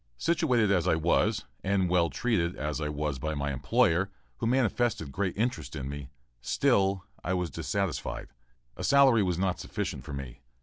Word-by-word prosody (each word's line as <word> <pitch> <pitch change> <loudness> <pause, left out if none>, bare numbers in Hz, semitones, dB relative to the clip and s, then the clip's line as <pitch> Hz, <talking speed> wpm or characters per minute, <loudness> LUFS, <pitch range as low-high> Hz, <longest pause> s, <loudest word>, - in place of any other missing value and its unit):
Situated 130 - +2
as 90 -3 +2
I 85 - +4
was, 105 +6 +1 0.2
and 95 -1 +2
well 85 -1 +3
treated 85 - 0
as 75 +2 -3
I 75 - -1
was 75 -2 -2
by 80 +3 -2
my 70 0 -2
employer, 80 +8 +2 0.3
who - - -1
manifested 120 - +1
great 95 +5 -2
interest 85 - -2
in 65 -3 -4
me, 70 -1 -6 0.3
still 95 +10 +2 0.2
I 95 - 0
was 90 -4 -2
dissatisfied. 100 +4 -3 0.5
A - - -6
salary 135 -5 +6
was 90 -4 0
not 95 -1 0
sufficient - - -4
for 75 - -8
me. 70 -3 -7
90 Hz, 170 wpm, -29 LUFS, 75-100 Hz, 0.5 s, salary